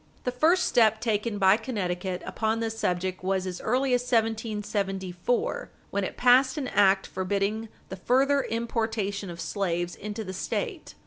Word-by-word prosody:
The 250 - -1
first 315 +9 +3
step 220 -2 +4
taken 220 -1 -1
by 195 +1 +5
Connecticut 190 -6 -3
upon 220 0 -1
this 225 -1 -2
subject 185 -2 -1
was 190 0 0
as 180 -1 -5
early 255 +3 +1
as 245 - +3
1774, 215 -4 -1 0.2
wen 200 0 0
it - - -4
passed 255 +2 +5
an 270 -4 -2
act 195 -1 +4
forbidding 200 +4 -2 0.2
the 190 - -5
further 270 +8 +2
importation 220 -4 -2
of 170 -1 -8
slaves 175 -3 -2
into 210 +2 -5
the 190 -2 -6
State. 370 - -4
215 Hz, 150 wpm, -27 LUFS, 190-235 Hz, 0.2 s, by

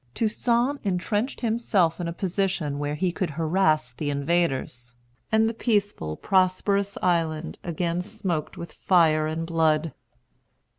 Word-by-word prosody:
Toussaint 235 +5 +1
entrenched 205 +6 -1
himself 220 -8 +1
in 170 - -2
a - - -2
position 180 -5 -1
where 145 0 -2
he 180 +4 0
could 185 -1 -2
harass 155 -3 +1
the 145 +5 -4
invaders; 140 -5 -1 0.4
and 220 0 +4
the 225 - -1
peaceful, 205 - -1
prosperous 195 +1 +1
island 165 -3 0
again 170 0 -1
smoked 185 -6 -4
with 170 - -8
fire 160 -4 +3
and 160 +1 -3
blood. 160 -1 +1
175 Hz, 130 wpm, -25 LUFS, 155-200 Hz, 0.4 s, and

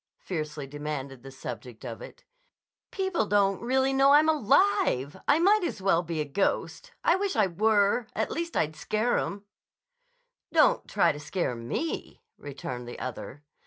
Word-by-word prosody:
fiercely 155 -4 -5
demanded 140 -2 -6
the 135 - -10
subject 125 -2 -8
of 115 -2 -7
it. - - -12 0.7
"People 380 - -1
don't 195 -2 +2
really 265 +3 +1
know 270 +1 +5
I'm 300 +2 +6
alive. 275 - +2
I 285 - +5
might 395 +4 +4
as 340 - -3
well 190 -3 +2
be 165 -2 -4
a 150 - 0
ghost. 195 - -2
I 335 - +4
wish 395 0 -1
I 215 - +4
were. 205 +4 +2
At - - -1
least 335 0 -3
I'd 155 0 0
scare 215 +9 0
'em." 200 +1 -5 1.1
"Don't - - +3
try - - +3
to 145 - -7
scare 150 -2 -2
me," 120 - -4
returned 130 -3 -7
the 120 - -8
other. 130 +2 -7
195 Hz, 160 wpm, -27 LUFS, -, 1.1 s, I'm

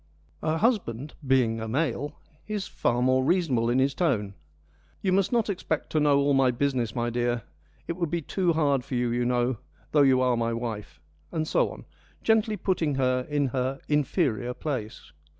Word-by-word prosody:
Her 155 +1 0
husband, 155 - 0
being 125 -4 +3
a 110 - -4
male, 145 +2 -1 0.3
is 210 -2 -3
far 120 +1 0
more 130 +1 +3
reasonable 135 -8 +2
in 120 - +2
his 135 +1 +2
tone: 115 - 0 0.3
' 75 0 -35
You 190 - +2
must 195 0 +2
not 235 -3 +2
expect 180 -6 -2
to 155 - +2
know 145 -1 +4
all 140 0 +3
my 135 -1 +4
business, 125 -3 -1
my 120 -1 -1
dear: 120 -1 0 0.4
it - - -1
would 170 -3 -1
be 170 0 -2
too 180 +2 +1
hard 140 -5 +2
for 140 -1 -5
you, 120 -1 +1
you 120 +1 0
know, 125 0 +1 0.3
though 150 - +4
you 135 -2 +5
are 125 -1 +3
my 115 0 0
wife,' 115 -3 -5 0.3
and 155 -1 -2
so - - +2
on, - - -10 0.4
gently 220 -1 +2
putting 170 -6 0
her 130 -1 +1
in 145 -2 +1
her 130 +2 -2
inferior 135 - 0
place. 130 -8 -5
135 Hz, 185 wpm, -27 LUFS, 120-160 Hz, 0.4 s, you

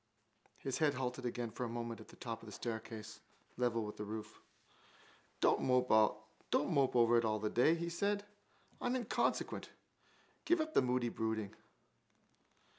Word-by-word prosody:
His 135 -2 -3
head 150 -3 +3
halted 125 0 -2
again 120 -1 -3
for 125 - -4
a 120 - -2
moment 115 -1 -4
at - - -13
the - - -14
top 115 -2 -5
of 115 - -12
the - - -8
staircase, 110 -1 -5 0.4
level 120 -3 +1
with 105 - -7
the 105 - -4
roof: 105 0 -6 1.0
—Don't - - +4
mope 125 0 +3 1.0
over 120 0 +6
it - - -1
all 110 -1 +1
day, 120 +9 +3
he 170 0 -3
said. 200 +4 0 0.6
I'm 245 +1 +1
inconsequent. 245 -4 0 0.7
Give 345 - +3
up 315 0 -1
the - - +6
moody 125 -1 +1
brooding. 110 -2 -2
120 Hz, 150 wpm, -36 LUFS, 110-130 Hz, 1.0 s, over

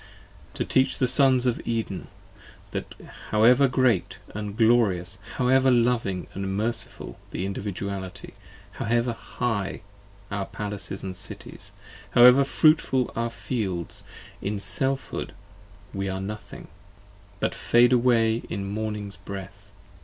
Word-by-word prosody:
To - - -2
teach 130 0 +2
the 130 - +2
Sons 130 -1 +5
10 125 - +3
Of - - -9
Eden, 115 -5 -3 0.6
that - - -5 0.3
however 120 +6 +5
great 125 -7 +1 0.2
and 105 0 -5
glorious, 100 -6 +2 0.2
however 130 +1 +3
loving 115 -7 +1
And 95 0 -3
merciful 115 +3 -1
the 95 - -3
Individuality; 100 -1 -5 0.4
however 120 +2 0
high 115 -3 -3 0.5
Our 100 -2 -2
palaces 100 -1 -4
and 95 -1 -5
cities, - - -5 0.4
and 120 - +8
however 125 +3 +8
fruitful 135 -3 +3
are 115 - 0
our - - -2
fields 105 -7 -4 0.4
In 105 +1 -2
Selfhood, 120 +8 0 0.6
we 95 0 -2
are 95 0 -3
nothing: 105 +2 -7 0.7
but - - 0
fade 120 +1 +4
away 115 -2 +3
in 100 -2 -3
morning's 105 -1 -4
breath. 100 0 -9
110 Hz, 125 wpm, -25 LUFS, 100-125 Hz, 0.7 s, and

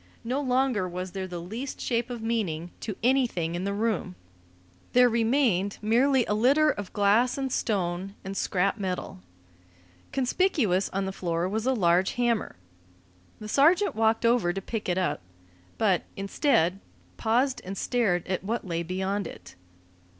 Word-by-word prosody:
No 255 +5 -1
longer 255 -7 +1
was 180 +1 -5
there 190 0 -4
the 180 -1 -6
least 225 +11 -6
shape 240 0 -1
of 240 -2 -6
meaning 180 -8 -2
to 210 - -5
anything 235 -10 +1
in 175 +2 -3
the 200 - -1
room; 215 - -1 0.8
there 250 0 +6
remained 225 -4 +1
merely 245 +4 +3
a - - -1
litter 280 +8 +4
of 205 -7 -6
glass 210 +6 +3
and 270 -1 -2
stone 190 -3 -1
and 195 0 -5
scrap 195 +2 0
metal. 185 - -4 0.9
Conspicuous 255 - +1
on 195 0 -2
the 190 - -3
floor 170 -2 -2
was 220 +5 -2
a 265 - +3
large 180 -2 +2
hammer. 240 -2 0 0.8
The 215 - -7
sergeant 330 - +4
walked 225 +1 +2
over 230 -7 +3
to 195 - -3
pick 210 +1 -4
it 180 - +1
up, 185 - 0 0.6
but, 195 -5 +2 0.2
instead, 195 - +1 0.4
paused 250 +4 +1
and 195 +2 -6
stared 205 -8 0
at 185 -1 -2
what 225 +3 -2
lay 170 -2 -2
beyond 190 +2 -2
it. - - -11
210 Hz, 155 wpm, -27 LUFS, 185-245 Hz, 0.9 s, there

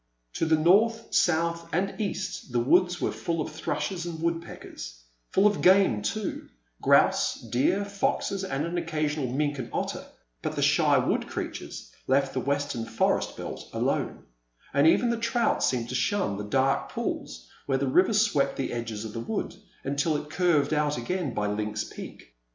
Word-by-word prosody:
To 165 - 0
the 160 0 +4
north, 215 +8 +3
south, 170 0 +1
and 195 +5 -1
east 200 -9 -4
the 120 - +1
woods 175 +8 +3
were - - 0
fall 165 -1 -3
of 155 +1 -3
thrushes 160 +3 -3
and 170 -2 -5
wood 165 0 0
peckers; - - -10 0.3
full 195 - +3
of 205 -1 +3
game, 185 - +5
too 195 - -3
— - - -37
grouse, - - +4
deer, 125 - +1
foxes, 200 -1 -1
and 145 -5 -2
an 175 +1 -2
occasional 155 -4 -1
mink 145 +1 -1
and 120 - -5
otter, - - -3 0.4
but - - -3
the - - 0
shy - - +4
wood - - 0
creatures - - -6 0.2
left 135 0 +2
the 130 - -1
western 140 -3 -1
forest - - 0
belt - - -7
alone, - - -1 0.5
and 140 +2 +5
even 235 +8 +4
the 235 - 0
trout 230 0 +1
seemed 120 -2 0
to - - -4
shun 130 - 0
the 105 - -5
dark 135 +5 +1
pools - - -4 0.2
where 135 -1 +2
the 140 - 0
river 185 +11 +4
swept 205 -9 +2
the 135 - -3
edges 115 -2 -4
of 110 - -7
the 115 - -4
wood 200 - -3 0.3
until 140 +3 0
it 150 +1 -8
curved 160 -4 +2
out 150 -2 +1
again 160 +4 -2
by 105 - 0
Lynx 105 +1 -2
Peak. - - -10
150 Hz, 180 wpm, -27 LUFS, 130-180 Hz, 0.5 s, game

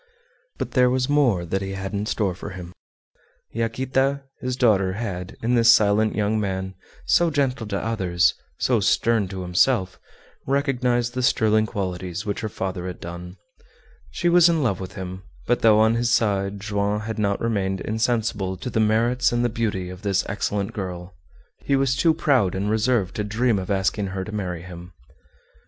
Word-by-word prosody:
But - - -4
there 125 -2 +4
was 130 0 0
more 130 -12 +2
that 95 +3 -2
he 95 0 -4
had 95 +1 -5
in 105 +1 -2
store 100 -5 0
for 95 - -8
him. 90 -2 -9 0.8
Yaquita, 130 +4 0 0.2
his 125 0 -3
daughter, 100 -7 +2
had, 95 -4 -5
in 120 +2 +1
this 115 -1 +6
silent 110 -1 +3
young 110 +1 +1
man, 95 -2 -3 0.3
so 175 -1 +3
gentle 135 -6 -1
to 100 -1 -2
others, 95 -5 +1 0.2
so - - +2
stern 115 -4 +2
to 95 0 -6
himself, 95 +2 +1 0.5
recognized 125 -3 0
the 130 - -2
sterling 110 -3 +2
qualities 95 -1 -4
which 100 -1 -2
her 110 - -3
father 95 -2 -4
had 90 - -7
done. 90 +2 -8 0.7
She 175 - -2
was 175 0 +6
in 165 -3 +1
love 100 -8 0
with 95 0 -7
him, 95 0 -7 0.2
but 120 - +1
though 110 -1 +5
on 110 +1 +4
his 120 0 0
side 100 -3 +1
Joam 100 0 -1
had 110 0 -5
not 100 -1 0
remained 95 -4 -1
insensible 110 -4 -1
to 125 - -6
the 110 - 0
merits 115 +4 +2
and 120 0 +1
the - - +2
beauty 105 -6 -2
of 90 0 -10
this 100 -2 0
excellent 100 0 -2
girl, 90 -2 -6 0.5
he 140 - 0
was 135 -1 +2
too 160 +3 +3
proud 130 - +2
and 100 +2 -1
reserved 110 -3 +1
to 105 - -1
dream 110 +1 +1
of 95 - -6
asking 100 +1 0
her 95 0 -4
to 110 - -8
marry 90 -5 -4
him. 90 0 -10
105 Hz, 180 wpm, -23 LUFS, 95-120 Hz, 0.8 s, this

